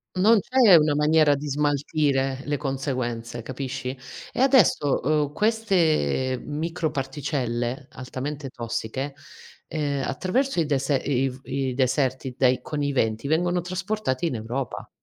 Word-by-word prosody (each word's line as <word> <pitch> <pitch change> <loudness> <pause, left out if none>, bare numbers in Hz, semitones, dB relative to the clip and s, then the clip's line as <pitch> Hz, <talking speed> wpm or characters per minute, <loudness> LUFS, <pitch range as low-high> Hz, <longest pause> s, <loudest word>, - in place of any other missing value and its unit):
Non 210 +4 +5
c'è 245 -2 +5
una 150 -2 +4
maniera 150 -1 +4
di 145 +2 -5
smaltire 140 -2 0
le 145 0 -1
conseguenze, 125 -4 -3
capisci? 130 0 -4 0.4
E - - -5
adesso, 240 - +4
uhm, 150 0 +1
queste 160 - +1
microparticelle 135 -5 -2
altamente 135 +2 -6
tossiche, 120 +4 -4 0.5
ehm, 145 -3 -2
attraverso 185 - 0
il 160 - +2
dese 140 -1 +1
i 135 -1 0
i 135 -1 -2
deserti 130 0 0
dai 130 -2 +3
con 150 -1 -3
i 140 -1 0
venti 110 +1 0
vengono 175 +3 +1
trasportati 185 -4 -2
in 145 -7 -1
Europa. 120 +4 -4
140 Hz, 125 wpm, -25 LUFS, 130-160 Hz, 0.5 s, Non